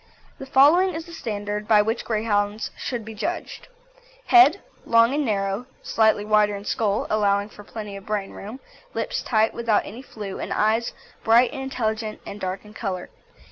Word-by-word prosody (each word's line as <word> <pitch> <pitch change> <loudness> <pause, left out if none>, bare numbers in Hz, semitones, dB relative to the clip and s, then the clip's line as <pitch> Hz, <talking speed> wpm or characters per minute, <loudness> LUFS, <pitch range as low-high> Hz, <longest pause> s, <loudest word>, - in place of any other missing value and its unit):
The 270 - -8
following 315 +8 +5
is 325 0 -5
the 340 - -12
standard 210 -6 -4
by 210 -2 +5
which 225 +2 -2
Greyhounds 210 -1 -1
should 240 -3 -4
be 220 - -8
judged. 325 +12 -5 0.6
HEAD 360 0 +7 0.2
Long 230 +2 +4
and 295 +1 +1
narrow, 200 0 -1 0.2
slightly 220 -2 +2
wider 210 -1 +3
in 200 0 -8
skull, 210 -2 0
allowing 205 -1 +2
for 205 - -13
plenty 210 -1 -7
of 195 +1 -10
brain 210 -2 -2
room; 215 +6 -9 0.4
lips - - -2
tight, 220 -2 +1
without 230 -3 +1
any 230 +5 -8
flew, 210 -7 -7
and - - -5
eyes 220 +2 +1 0.3
bright 235 +2 +4
and 270 - -5
intelligent 220 -4 -3
and 205 - -8
dark 190 +2 -4
in 210 - -14
colour. 190 -5 -4
215 Hz, 175 wpm, -24 LUFS, 205-240 Hz, 0.6 s, HEAD